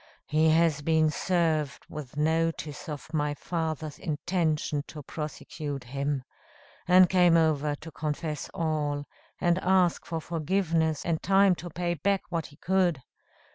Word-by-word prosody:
He 155 +1 +3
has 160 -2 +3
been 160 0 +3
served 160 -4 0
with 150 -3 -8
notice 160 -1 -1
of 150 +1 -7
my 150 -1 0
father's 160 -2 -3
intention 155 -2 -1
to 150 -2 -9
prosecute 145 -1 -5
him; 135 +2 -2 0.6
and 180 0 +7
came 175 -2 +5
over 150 -2 +2
to 160 +3 -11
confess 150 0 -3
all, 150 -3 -1 0.3
and 175 0 +2
ask 185 -2 +2
for 165 -1 -2
forgiveness, 165 -1 0
and 165 -2 0
time 195 0 +5
to 175 0 -7
pay 175 +1 -2
back 195 +5 0
what 170 -2 -2
he 145 - -17
could. 175 -7 +1
160 Hz, 135 wpm, -28 LUFS, 150-175 Hz, 0.6 s, and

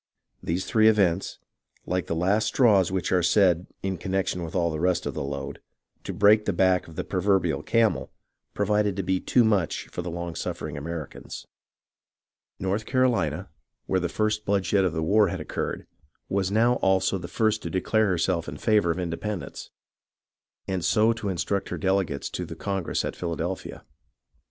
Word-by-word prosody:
These 85 +3 -2
three 110 -1 +4
events, 95 -4 +2 0.5
like 90 0 -1
the 85 - -1
last 95 +6 +2
straws 100 -9 +4
which 95 -2 -1
are 90 -1 +3
said 90 -1 +3 0.2
(in 95 -3 -2
connection 95 -1 -1
with 85 +1 -6
all 85 -2 +1
the 75 - -3
rest 90 0 +1
of - - -3
the - - -4
load) 70 0 -5 0.5
to - - -3
break 105 +3 +4
the 100 - 0
back 95 +1 +2
of 80 - -12
the - - -2
proverbial 95 -7 +1
camel, 115 -2 +1 0.4
proved 105 -1 +1
to 95 - -1
be 95 +1 0
too 125 - +3
much 100 -8 +1
for - - -5
the 90 - -5
long 85 0 -4
suffering 75 -2 -4
Americans. 80 +1 -7 1.1
North 100 +3 -2
Carolina, 125 - +1 0.4
where 95 - +1
the 90 -1 -2
first 110 0 0
bloodshed 100 -1 +1
of 90 - 0
the 80 -1 -1
war 105 +5 +4
had 90 +1 -3
occurred, 75 - -4 0.4
was 95 -1 0
now 115 +4 +3
also 95 0 +2
the 85 - -7
first 110 +4 +1
to 85 - -4
declare 110 +5 +1
herself 85 -3 0
in 75 - -7
favour 105 0 +2
of 85 - 0
independence, 90 +3 -4 1.0
and 95 -3 -2
so 110 +5 +3
to 110 -3 -4
instruct 95 +2 -2
her - - -3
delegates 95 -7 0
to - - -4
the - - -7
Congress 95 -4 -2
at - - -4
Philadelphia. 85 +1 -4
95 Hz, 175 wpm, -26 LUFS, 85-105 Hz, 1.1 s, three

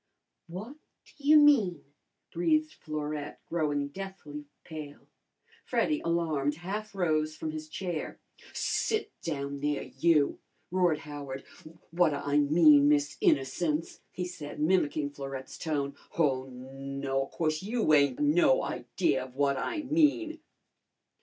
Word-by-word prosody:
"What 210 - -8 0.3
ta - - -20
you 295 +2 +6
mean?" 235 - +5 0.5
breathed 310 - +1
Florette, 150 -1 -5
growing 145 -4 -1
deathly 155 -5 -8 0.2
pale. 150 -3 -9 0.6
Freddy, 305 -1 0
alarmed, 160 -4 0
half 200 +5 -5
rose 155 -4 +1
from 155 - -4
his 155 0 -7
chair. 175 -2 -4 0.3
"Sit 435 0 -1
down 140 -3 -3
there 145 0 -1
you!" 140 +3 +2 0.3
roared 180 -4 +3
Howard. 140 -2 -7 0.5
"What 170 0 +4
ta 145 -1 -3
I 145 +1 +3
mean, 145 -1 +6
Miss 145 0 +2
Innocence?" 150 +3 +1
he 180 - -4
said, 155 -6 -8
mimicking 150 -3 +1
Florette's 135 -2 -7
tone. 145 -4 -2 0.2
"Oh, 135 -5 +2
no, 135 +1 -4
of - - -18
course 155 -2 0
you 215 -5 +1
ain't 140 -3 +4
no 150 -2 +4
idea 135 +2 -1
of 130 -1 -15
what 140 0 +2
I 310 - -2
mean!" 310 +2 +2
155 Hz, 125 wpm, -29 LUFS, 140-180 Hz, 0.6 s, you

